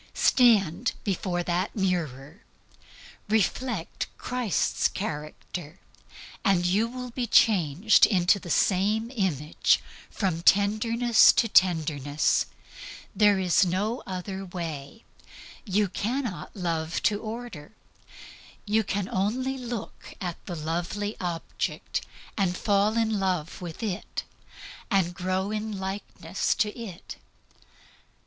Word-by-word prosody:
Stand 225 -4 +4
before 180 -3 -1
that 175 +2 -1
mirror, 170 - -2 0.9
reflect 220 -2 -1
Christ's 250 -5 0
character, 155 -1 -6 0.6
and 190 -4 +3
you 200 +6 +2
will 250 +1 -7
be 240 0 -2
changed 195 -2 +5
into 185 0 +3
the 175 - -10
same 210 +7 +2
image 160 - +1 0.3
from 180 -5 -1
tenderness 220 +5 +5
to 230 - +2
tenderness. 155 -7 +2 0.7
There 205 0 +5
is 185 0 +3
no 200 +7 -1
other 190 +1 -5
way. 170 0 -6 0.6
You 205 0 +2
cannot 210 - -3
love 165 -3 -2
to 205 -1 +2
order. 220 -8 -7 0.9
You 215 +1 +2
can 200 -1 -2
only 250 +8 -1
look 240 -4 -7
at 175 -3 -5
the 175 - -4
lovely 175 +7 -3
object, 175 -2 -3 0.3
and 185 -3 0
fall 205 +2 +2
in 220 -2 +1
love 180 -3 -2
with 175 +4 -7
it, 195 -5 -3 0.7
and 190 -5 +2
grow 185 +2 -1
into 215 -1 -3
likeness 190 +1 -2
to 210 -2 0
it. 215 -8 -8
195 Hz, 105 wpm, -27 LUFS, 175-220 Hz, 0.9 s, changed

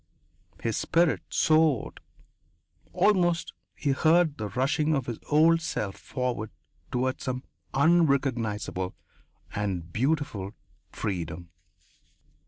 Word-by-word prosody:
His 115 -2 0
spirit 160 - +2
soared; 155 -5 +2 0.9
almost 175 -5 +2 0.2
he 145 - 0
heard 160 +1 +3
the 105 - -2
rushing 140 +6 +1
of 135 -3 -1
his 120 -2 -5
old 165 +2 +5
self 105 -10 -3
forward 125 -5 -3 0.4
toward 130 +1 -1
some 130 0 -3 0.3
unrecognizable 135 - +1 0.6
and 90 -5 -3
beautiful 120 -7 -1 0.4
freedom. 85 -4 -4
130 Hz, 90 wpm, -27 LUFS, 105-155 Hz, 0.9 s, old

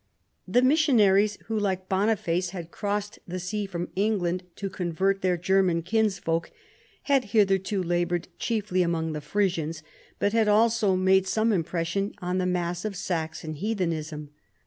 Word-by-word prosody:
The 245 - +3
missionaries 215 -9 +4
who 220 -1 -1
.like 190 -2 -1
Boniface 190 -3 +1
had 175 -3 -7
crossed 205 0 -3
the 180 +1 -4
sea 200 +3 -3
from 175 -2 -4
England 185 -3 0
to 200 - -4
convert 190 +2 -1
their 180 -1 +1
German 180 -1 +2
kinsfolk 190 -5 0 0.5
had 275 -3 +2
hitherto 195 -2 +2
labored 175 0 0
chiefly 210 -5 0
among 165 -2 0
the 150 - -4
Frisians, 165 -2 -1 0.3
but 205 - 0
had 225 -2 +3
also 215 -1 +3
made 190 +1 +3
some 220 +3 +2
impression 175 +3 -1
on 180 0 -1
the 180 - 0
mass 175 -1 -1
of 215 -2 -3
Saxon 160 -3 -3
heathenism. 160 -5 -3
190 Hz, 145 wpm, -26 LUFS, 175-210 Hz, 0.5 s, missionaries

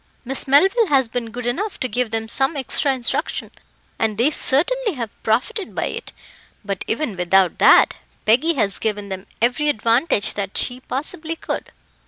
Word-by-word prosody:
Miss 270 +2 -2
Melville 385 - +4
has 270 -5 +3
been 230 0 -4
good 240 +1 -7
enough 375 - -2
to 255 - -1
give 245 +1 -1
them 225 0 -3
some 270 +6 +1
extra 275 +2 +1
instruction, 265 +4 -2 0.5
and 220 -2 0
they 250 +7 +3
certainly 425 - +2
have 235 -6 -5
profited 365 - -1
by - - -1
it; - - -7 0.5
but 195 -2 -3
even 230 -3 -2
without 180 0 +2
that, - - +6 0.3
Peggy 265 +10 +3
has 205 -7 0
given 205 -2 -3
them 190 0 -6 0.2
every 280 +5 +2
advantage 230 -1 +1
that 200 -1 -4
she 250 0 +1
possibly 315 +5 -4
could." - - -5
250 Hz, 165 wpm, -21 LUFS, 220-300 Hz, 0.5 s, that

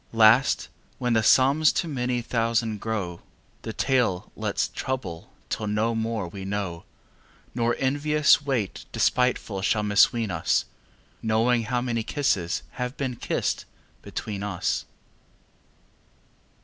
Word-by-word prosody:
Last 115 +4 +5 0.3
when 125 -1 0
the 110 - +4
sums 135 +8 +5
to 170 - -1
many 125 -4 -1
thousands 115 -2 0
grow, 100 -6 -3
10 - - -25 0.4
The 110 - -5
tale 120 -10 0
let's - - -1
trouble 125 -11 -5 0.2
till 110 - -3
no 105 +3 +1
more 110 -3 -2
we 95 +3 -8
know, 95 -4 -4 0.7
Nor 120 -1 +1
envious 145 +3 +3
wight 130 -9 -2
despiteful 125 -6 +1
shall 105 +2 +1
misween 105 +1 +3
us 80 -2 +1 0.6
Knowing 115 +1 +2
how 125 +2 0
many 120 -2 -1
kisses 110 - 0 0.2
have 125 +2 -3
been 130 -3 -2
kissed - - -2 0.4
between 100 -2 -5
us. 100 -3 -1
115 Hz, 125 wpm, -25 LUFS, 105-125 Hz, 0.7 s, Last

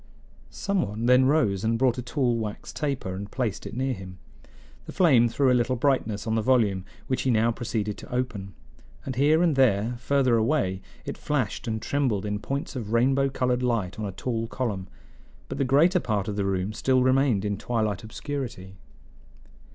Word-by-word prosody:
Some 200 -2 -1
one 110 -4 -3
then 125 +1 +5
rose 120 -10 +2
and 115 +1 +1
brought 125 0 +2
a - - -2
tall 125 -1 0
wax 105 -2 -5
taper 140 -10 -2
and 100 +2 -6
placed 120 -6 -3
it - - -8
near 130 0 0
him. 95 -4 -9 0.7
The - - -6
flame 135 -11 +5
threw 135 +2 +2
a - - +5
little 125 +1 +2
brightness 120 -5 0
on 110 - -1
the 110 - +1
volume, 105 -6 +2 0.2
which 130 - -1
he 130 - 0
now 115 -1 +3
proceeded 110 -3 -3
to - - -12
open; 115 -7 -3 0.5
and 130 - -4
here 150 +6 +4
and 165 -4 +3
there, 120 -2 +2
further 130 -2 +2
away, 110 -6 +1 0.2
it - - -6
flashed 130 -7 -2
and 110 -1 -1
trembled 120 -6 0
in 105 0 -2
points 140 +8 -4
of 115 -3 -4
rainbow 135 +3 +3
colored 125 -2 0
light 115 -7 -1
on 110 - -2
a - - -4
tall 115 +4 -3
column; 110 -7 -3 0.6
but - - -6
the - - +3
greater 160 +8 +4
part 105 - -1
of 105 - -3
the 100 -1 -1
room 95 +1 -1
still 130 +3 +2
remained 130 -5 +2
in 105 0 0
twilight 110 -2 -2
obscurity. 110 -6 -6
120 Hz, 190 wpm, -26 LUFS, 105-135 Hz, 0.7 s, then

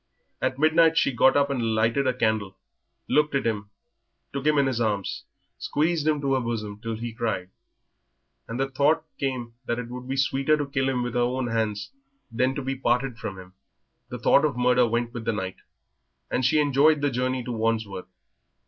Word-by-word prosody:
At 130 0 0
midnight 160 +2 +4
she - - +3
got 130 +3 +4
up 140 0 +2
and 115 -4 0
lighted 115 +5 +2
a 130 - +2
candle, 110 -5 0 0.5
looked 150 -1 +2
at 135 - 0
him, 105 -3 -2 0.6
took 140 +1 -2
him 150 -1 +4
in 140 - +4
her 125 -3 0
arms, 100 -3 -2 0.3
squeezed 155 +1 0
him 155 -1 +2
to 135 -1 +1
her 135 - +2
bosom 110 -4 -4
till 115 -1 -3
he 115 +1 -5
cried, 110 -6 -3 1.0
and 115 +2 -5
the 135 - +1
thought 145 +4 +2
came 125 -4 -3
that 120 - 0
it 125 -1 -5
would 125 +1 -7
be 135 +1 -2
sweeter 135 +2 +2
to 145 - -1
kill 135 -1 0
him 125 -2 0
with 120 -1 -3
her 120 - 0
own 125 +1 0
hands 110 -2 -2 0.4
than 130 +3 +1
to 145 - -3
be 135 +1 -2
parted 125 -1 0
from 100 -5 -5
him. 90 0 -12 0.6
The 125 - -5
thought 130 +4 +4
of 145 -5 0
murder 125 0 +4
went 120 +1 -1
with 120 - -5
the 115 - +1
night, 95 -2 -4 0.7
and 130 - 0
she 130 +5 +3
enjoyed 145 +1 +4
the 145 -1 +1
journey 130 +1 -1
to 125 - -5
Wandsworth. 110 -4 -2
125 Hz, 200 wpm, -25 LUFS, 115-140 Hz, 1.0 s, midnight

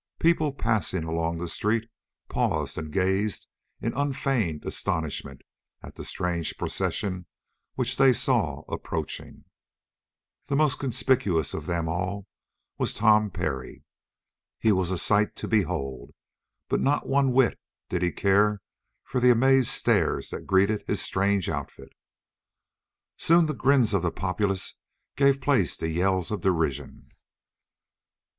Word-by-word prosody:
People 160 -3 +2
passing 110 -9 -1
along 80 +1 -2
the 85 +1 -4
street 110 +6 -1 0.4
paused - - -1
and 80 -1 -5
gazed 95 +3 0 0.4
in 115 - -2
unfeigned 135 - -1
astonishment 70 -4 -3 0.4
at - - -10
the - - -9
strange 85 -2 -2
procession 90 -3 -2 0.5
which - - -1
they 135 -1 +6
saw 120 - 0
approaching. - - -5 1.0
The 140 - 0
most 150 -2 +2
conspicuous 125 - 0
of - - -5
them 85 -2 -1
all 95 +4 -3 0.5
was - - 0
Tom 105 -1 +4
Parry. 65 -7 -4 0.7
He 110 - +3
was 95 -3 +1
a 95 - -1
sight 105 +4 +2
to - - -5
behold, 80 - -1 0.5
but - - 0
not 140 +2 +1
one 135 -1 +3
whit 130 -1 +3 0.3
did 90 - -2
he 90 -1 +1
care 100 +1 +2 0.4
for 130 - -2
the 125 0 +5
amazed 130 +1 +5
stares - - +1
that - - -7
greeted 100 +2 +3
his - - -1
strange 100 -1 0
outfit. - - -6 1.2
Soon 170 +1 +4
the 155 - -1
grins 130 -5 +3
of 100 - +2
the 85 -1 0
populace 95 +2 -1 0.4
gave 140 0 +4
place 125 - +1
to 80 - -2
yells 90 +2 0
of 105 -4 -2
derision. 80 -7 -1
100 Hz, 130 wpm, -26 LUFS, 85-125 Hz, 1.2 s, they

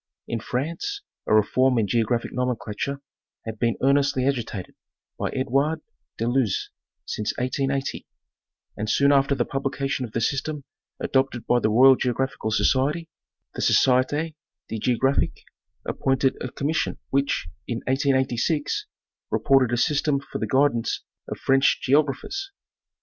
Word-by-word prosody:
In 115 - -2
France 170 - -3 0.2
a - - +2
reform 125 +4 +3
in 110 - +3
geographic 115 +3 0
nomenclature 125 +2 -2 0.4
had 110 -1 -6
been 115 -1 +1
ear 135 +1 +5
nestly 140 -2 +2
agitated 115 -8 -3 0.5
by - - -1
Edouard 140 +4 0 0.4
de 115 - -1
Luze 120 -5 0 0.3
since 105 0 -3
1880, 135 +2 -2 0.7
and 105 +1 -3
soon 140 +5 +4
after 140 0 +3
the - - 0
publication 135 -1 -2
of 115 -3 -7
the - - 0
system 140 +5 -1 0.4
adopted 130 -3 0
by 120 - +3
the 110 - +1
Royal 130 +5 +7
Geographical 130 -1 -1
Society, 145 +8 +1 0.4
the - - -5
Société 145 +5 +3 0.4
de 110 - -3
Géographie 130 +4 +1 0.5
appointed 135 0 +1
a 125 - -4
commission 150 +3 -1
which, 140 -10 0 0.2
in 120 -1 -3
1886, 135 +2 0 0.4
reported 135 -3 +3
a 120 - +1
system 145 +2 +2
for 140 - -7
the - - -2
guidance 135 -4 +1 0.2
of - - -5
French 135 0 +3
geogra 140 0 +4
phers. 395 - -5
135 Hz, 135 wpm, -24 LUFS, 120-140 Hz, 0.7 s, Royal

